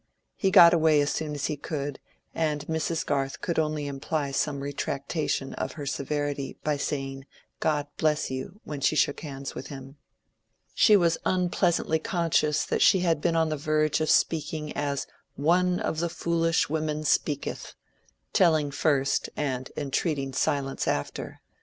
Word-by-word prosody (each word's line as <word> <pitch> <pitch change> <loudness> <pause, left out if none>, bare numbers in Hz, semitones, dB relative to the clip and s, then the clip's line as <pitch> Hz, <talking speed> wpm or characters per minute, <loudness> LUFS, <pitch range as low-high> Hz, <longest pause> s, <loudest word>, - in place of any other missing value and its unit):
He 195 - +1
got 175 -3 +8
away 160 -2 +4
as 145 0 +1
soon 155 -2 -3
as 145 - -2
he 150 - -1
could, 145 -1 -4 0.3
and 150 -3 -1
Mrs. 160 +1 -1
Garth 135 -1 -1
could 170 -2 -1
only 155 -1 -1
imply 140 +1 -2
some 140 0 -1
retractation 140 0 -2
of - - -4
her 145 -2 -7
severity 145 0 -3
by 150 -1 +1
saying 135 -1 -4 0.3
"God 150 -2 +1
bless 150 -3 +1
you" 130 +10 -6
when 145 -2 -6
she - - +2
shook 145 - +2
hands 140 -3 -6
with - - -7
him. 135 0 -10 0.8
She 215 - +6
was 170 -3 +2
unpleasantly 175 -3 +1
conscious 155 -3 +1
that - - -1
she 190 - +6
had 165 -4 +1
been 170 +1 +1
on 160 -1 +2
the 155 - -2
verge 155 +1 +1
of 155 - 0
speaking 155 -1 +1
as 145 -1 -1 0.3
"one 180 +4 +2
of 155 - -2
the 170 0 0
foolish 165 -1 +1
women 155 0 -2
speaketh"—telling 150 +1 -1
first 140 -2 +1
and 130 -3 -2
entreating 140 -1 -1
silence 140 -1 -1
after. 70 - -3
150 Hz, 155 wpm, -27 LUFS, 140-160 Hz, 0.8 s, got